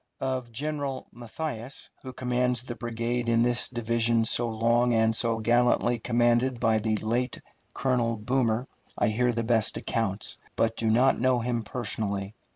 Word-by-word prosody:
Of 130 -2 -3
General 140 +1 -3
Matthias, 120 +1 -7
who 130 - -7
commands 125 -1 0
the 125 - -6
brigade 120 0 -2
in 115 0 +3
this 120 0 +3
division 115 -1 +1
so 120 +1 +1
long 115 +2 +2
and 110 0 +3
so 115 0 +1
gallantly 120 +1 +2
commanded 120 +2 +2
by 110 -1 +2
the 110 0 0
late 120 +4 -1 0.4
Colonel 120 -3 0
Boomer, 120 +1 0 0.3
I - - +2
hear 120 +3 +1
the 115 0 -2
best 110 -2 +2
accounts, 105 -3 -2 0.2
but 115 0 +1
do 115 -1 -1
not 125 +4 +3
know 130 0 +3
him 120 0 -1
personally. 105 -3 -3
120 Hz, 155 wpm, -27 LUFS, 115-125 Hz, 0.4 s, in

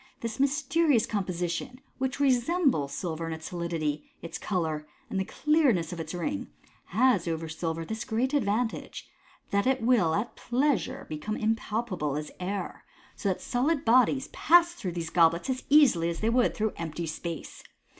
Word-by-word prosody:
This 230 +2 -4
mysterious 280 -1 +2
composition, 185 +4 -3 0.2
which 265 +1 -2
resembles 265 - +2
silver 165 -2 -3
in 165 - -3
its 160 0 -8
solidity, 165 -4 -3
its 170 - -6
colour, 160 -6 -2 0.2
and 195 - 0
the - - +1
clearness 270 - +2
of 170 - -7
its 165 +2 -5
ring, 165 - -3 0.4
has 220 -3 +2
over 165 -1 -2
silver 165 +1 -3
this 220 +3 -4
great 250 +5 -1
advantage, 225 -3 -1 0.4
that 200 +4 +2
it 265 -3 +1
will 215 -10 +3
at 215 +3 -2
pleasure 255 - 0
become 155 +8 -4
impalpable 215 - -1
as 150 0 -5
air, 195 +2 -4 0.3
so 200 - -1
that 185 - -2
solid 275 +5 0
bodies 255 +3 +4
pass 345 +1 +4
through 190 - -5
these 165 -1 -4
goblets 170 +7 +3
as 255 - -4
easily 255 - +5
as 170 - -4
they 225 +1 +2
would 245 0 +2
through 215 0 0
empty 165 0 -4
space. 165 +1 -6
205 Hz, 160 wpm, -28 LUFS, 165-255 Hz, 0.4 s, easily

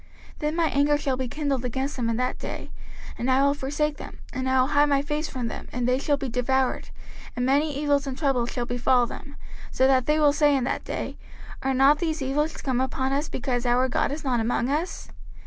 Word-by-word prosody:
05:031:017 - - -18
Then 300 0 -1
my 335 -1 +2
anger 290 +1 +3
shall 275 -2 -1
be 255 0 -3
kindled 280 -1 -2
against 265 +3 -2
them 235 -3 -1
in 230 - 0
that 250 0 -1
day, - - -6 0.5
and 245 - -1
I 260 +1 +4
will 280 0 +4
forsake 290 +2 -2
them, - - -9 0.2
and 260 +1 -2
I 260 0 +3
will 255 +2 +3
hide 290 0 +4
my 280 -1 +2
face 300 +2 -2
from 250 -3 -3
them, - - -7
and 245 0 -1
they 250 +1 +2
shall 285 0 +1
be 275 - -4
devoured, 255 +2 0 0.5
and 245 - -1
many 285 +2 +2
evils 285 -1 +1
and 260 -1 -4
troubles 270 -5 +1
shall 245 - -2
befall 245 0 +2
them; 280 +4 -9 0.3
so 260 - +2
that 260 -2 +3
they 300 0 +3
will 295 -2 +5
say 295 -2 +4
in 260 - -1
that 245 - -2
day, - - -4 0.4
Are 270 0 0
not 275 +3 +5
these 320 -2 -1
evils 295 +3 -1
come 260 -3 -1
upon 265 0 -1
us, 290 +3 -1
because 245 -2 -2
our 250 +2 +3
God 255 - 0
is 300 +2 -5
not 255 -4 +1
among 235 +2 0
us? 315 +6 -2
270 Hz, 235 wpm, -25 LUFS, 255-290 Hz, 0.5 s, will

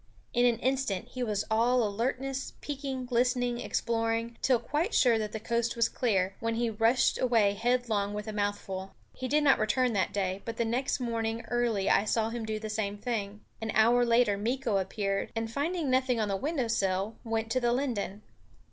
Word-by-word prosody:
In 245 0 +4
an 235 -2 +2
instant 250 -5 -1
he 255 - -6
was 210 -4 -1
all 240 +3 +3
alertness, 260 +6 -2
peeking, 270 -3 -4
listening, 245 0 +1
exploring, 230 0 -1
till 255 -2 +4
quite 300 - -1
sure 235 -3 +4
that 210 -1 -3
the 220 - -4
coast 235 +1 -1
was 230 -1 +3
clear, 195 -6 0
when 230 0 -1
he 235 0 0
rushed 225 +4 +2
away 225 -5 +3
headlong 220 -2 0
with 210 - -4
a 215 - -4
mouthful. 200 -2 -3 0.2
He 255 - -5
did 300 +3 +2
not 275 -2 +5
return 240 +3 +2
that 190 -4 +1
day; 190 -1 -2
but 230 -1 -5
the 235 - +1
next 250 +5 0
morning 230 -2 -2
early 235 -5 0
I 200 - +4
saw 225 0 +1
him 230 -2 -4
do 215 0 -2
the 215 0 -5
same 210 -1 -2
thing. 210 -3 -3 0.2
An 225 - -3
hour 235 +3 +5
later 230 -4 +3
Meeko 235 -1 0
appeared 195 +1 -2
and, 225 0 -2
finding 300 +1 -1
nothing 255 -2 +2
on 215 -2 0
the 195 - 0
window 275 - -1
sill, 200 -1 0
went 225 -1 -2
to 255 - +2
the 240 -1 +1
linden. 230 -6 -2
230 Hz, 190 wpm, -29 LUFS, 210-250 Hz, 0.2 s, not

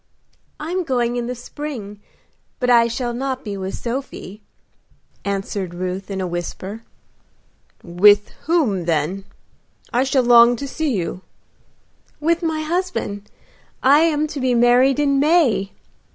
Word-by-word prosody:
"I 310 +2 -5
am 370 0 -1
going 245 -5 0
in 240 -1 -2
the 250 - -4
spring, 240 -5 -7 0.6
but 250 -1 +1
I 235 -1 +6
shall 240 +1 -3
not 260 +1 -3
be 205 -1 -4
with 190 0 -5
Sophie," 235 -5 -6 0.8
answered 195 -2 -3
Ruth, 185 +2 -4
in 195 -1 -4
a 190 - -1
whisper. 180 +4 -5 1.0
"With 205 +4 +4 0.2
whom 250 - +1
then? 170 +4 -1 0.7
I 245 +2 +3
shall 270 -1 +2
long 240 0 +7
to 280 +4 -6
see 310 +1 -2
you." 185 -3 -3 1.0
"With 335 +3 +1
my 320 -2 -1
husband. 310 - -3 0.5
I 280 +3 +6
am 310 -2 +2
to 290 - -5
be 255 -2 +1
married 245 +3 +4
in 280 -2 +2
May." 290 - +3
240 Hz, 135 wpm, -20 LUFS, 200-280 Hz, 1.0 s, long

